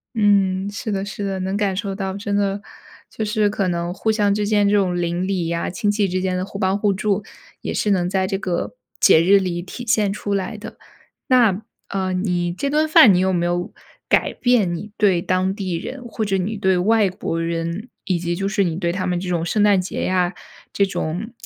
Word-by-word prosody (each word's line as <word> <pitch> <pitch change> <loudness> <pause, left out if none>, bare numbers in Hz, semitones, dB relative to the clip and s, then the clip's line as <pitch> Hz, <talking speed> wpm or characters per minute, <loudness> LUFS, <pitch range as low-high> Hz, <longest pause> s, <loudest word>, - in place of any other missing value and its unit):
嗯， 200 -3 +2
是 210 +1 -4
的， 195 -1 -1
是 205 0 -5
的， 195 -1 -2
能 190 +1 -2
感 200 -2 0
受 195 +1 -3
到， 190 -1 -3
真 200 -1 -2
的 200 0 0 0.5
就 220 - -4
是 210 0 +1
可 200 -2 -1
能 175 0 -2
互 220 +3 0
相 205 -2 +2
之 210 0 -1
间 205 -1 +3
这 205 - +3
种 180 -3 +1
邻 175 +1 -1
里 190 -3 -1
呀、 170 0 -2
亲 205 +3 0
戚 205 0 +1
之 185 0 -1
间 185 -1 -1
的 180 - -1
互 195 0 -8
帮 190 0 +1
互 205 -1 +2
助 205 +1 0 0.4
也 - - -3
是 210 - 0
能 180 -3 +2
在 190 0 +1
这 195 - -1
个 185 - -3 0.3
节 160 - +6
日 195 +4 +6
里 180 -2 -2
体 215 +7 -8
现 215 -4 +2
出 205 0 -3
来 200 +3 -3
的。 215 - -9 0.5
那， 230 -6 +4 0.3
呃， 190 -1 -2
你 180 -2 -1
这 275 +10 -2
顿 305 +2 +2
饭 250 -9 +7
你 180 - +3
有 190 0 +2
没 175 -1 +1
有 175 0 -2 0.4
改 - - +2
变 230 -9 +2
你 205 +5 -7
对 190 -5 +3
当 185 +1 0
地 190 -4 -3
人 260 +8 -7
或 225 -2 -3
者 195 -1 +1
你 200 +4 -2
对 190 -1 +2
外 210 +3 +3
国 180 -3 -3
人， 170 +6 -3 0.2
以 185 -3 0
及 170 0 -2
就 195 +2 -2
是 200 0 +1
你 165 -3 -1
对 170 -1 -1
他 185 +1 -2
们 180 -1 0
这 180 0 -4
种 170 -2 0
圣 210 +4 +1
诞 205 -2 +5
节 185 - -4
呀， 180 -1 +1 0.4
这 200 - +3
种 190 +3 -3
195 Hz, 245 characters per minute, -21 LUFS, 180-205 Hz, 0.5 s, 饭